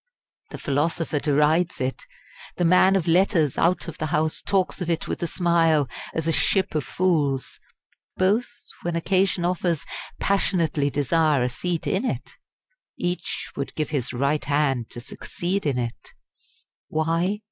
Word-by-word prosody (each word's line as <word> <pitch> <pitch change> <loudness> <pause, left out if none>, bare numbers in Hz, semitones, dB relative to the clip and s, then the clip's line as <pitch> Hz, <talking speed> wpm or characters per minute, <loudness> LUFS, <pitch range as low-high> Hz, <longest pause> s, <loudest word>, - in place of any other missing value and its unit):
The - - -7
philosopher 155 +1 0
derides 150 +4 +2
it; 130 0 -3 0.5
the 175 - 0
man 185 +3 +5
of 185 -4 +1
letters 165 -4 +3
out 175 +1 +1
of 165 - -7
the 155 - -1
House 155 +1 0
talks 190 -1 0
of 175 - -2
it 165 -1 -1
with - - -4
a 170 - 0
smile 165 -5 +2 0.3
as 160 0 -1
a - - +3
"Ship 190 +4 +1
of 155 -2 0
Fools"; 145 -4 0 0.6
both, 205 +6 +2 0.3
when 175 -1 -2
occasion 185 +1 +1
offers, 175 -3 0 0.3
passionately 165 -7 +1
desire 145 -1 +2
a 125 - +1
seat 170 +6 -3
in 190 - 0
it; 255 - -3 0.6
each 175 -1 -3
would 140 - -4
give 155 -1 -2
his 135 -5 -1
right 140 +4 0
hand 140 -4 +1
to - - -8
succeed 175 +8 -3
in 135 -3 0
it. 120 -1 -4 0.8
Why? 165 +5 0
165 Hz, 150 wpm, -24 LUFS, 145-180 Hz, 0.8 s, man